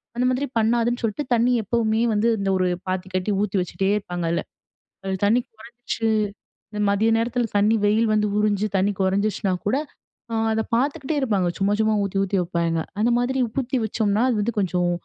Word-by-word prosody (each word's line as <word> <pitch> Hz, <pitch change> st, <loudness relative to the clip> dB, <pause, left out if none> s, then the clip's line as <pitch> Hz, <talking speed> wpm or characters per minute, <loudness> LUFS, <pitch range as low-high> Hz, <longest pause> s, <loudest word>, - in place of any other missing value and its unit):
அந்த 250 Hz, -, 0 dB
மாதிரி 255 Hz, +3 st, 0 dB
பண்ணாதுன்னு 235 Hz, +2 st, +1 dB
சொல்லிட்டு 225 Hz, +7 st, -1 dB
தண்ணி 240 Hz, +2 st, +2 dB
எப்பவுமே 220 Hz, +1 st, +1 dB
வந்து, 215 Hz, +2 st, +2 dB
இந்த 195 Hz, 0 st, -1 dB
ஒரு 185 Hz, -1 st, +1 dB, 0.2 s
பாத்தி 185 Hz, 0 st, -2 dB
கட்டி 185 Hz, +3 st, 0 dB
ஊத்தி 200 Hz, -1 st, -1 dB
வச்சிட்டே 190 Hz, +2 st, -2 dB
இருப்பாங்கல்ல. 175 Hz, -4 st, -2 dB, 0.6 s
அது 190 Hz, 0 st, -2 dB
தண்ணி 230 Hz, +5 st, +4 dB
குறைஞ்ச்சு, 230 Hz, 0 st, -4 dB, 0.6 s
இந்த 210 Hz, -1 st, -5 dB
மதிய 210 Hz, +3 st, +2 dB
நேரத்தில 235 Hz, +1 st, 0 dB
தண்ணி 210 Hz, +2 st, +4 dB
வெயில் 220 Hz, +2 st, +3 dB
வந்து 210 Hz, 0 st, +2 dB
உறிஞ்சு 210 Hz, -1 st, +1 dB
தண்ணி 195 Hz, +2 st, +2 dB
குறைஞ்சிச்சுனா 195 Hz, 0 st, 0 dB
கூட, 215 Hz, +6 st, +2 dB, 0.8 s
அதை 220 Hz, 0 st, +1 dB
பார்த்துக்கிட்டே 280 Hz, +3 st, -1 dB
இருப்பாங்க. 205 Hz, -8 st, +1 dB
சும்மா 200 Hz, +1 st, +1 dB
சும்மா 220 Hz, 0 st, +2 dB
ஊத்தி 195 Hz, 0 st, -2 dB
ஊத்தி 195 Hz, 0 st, 0 dB
வப்பாங்க. 170 Hz, -1 st, -1 dB, 0.2 s
அந்த 230 Hz, +3 st, +3 dB
மாரி 255 Hz, +1 st, 0 dB
ஊத்தி 260 Hz, +3 st, -2 dB
வச்சோம்னா, 215 Hz, 0 st, 0 dB
அது 230 Hz, -, 0 dB
வந்து 235 Hz, +2 st, -2 dB
கொஞ்சம் 180 Hz, -2 st, 0 dB
215 Hz, 170 wpm, -23 LUFS, 195-235 Hz, 0.8 s, தண்ணி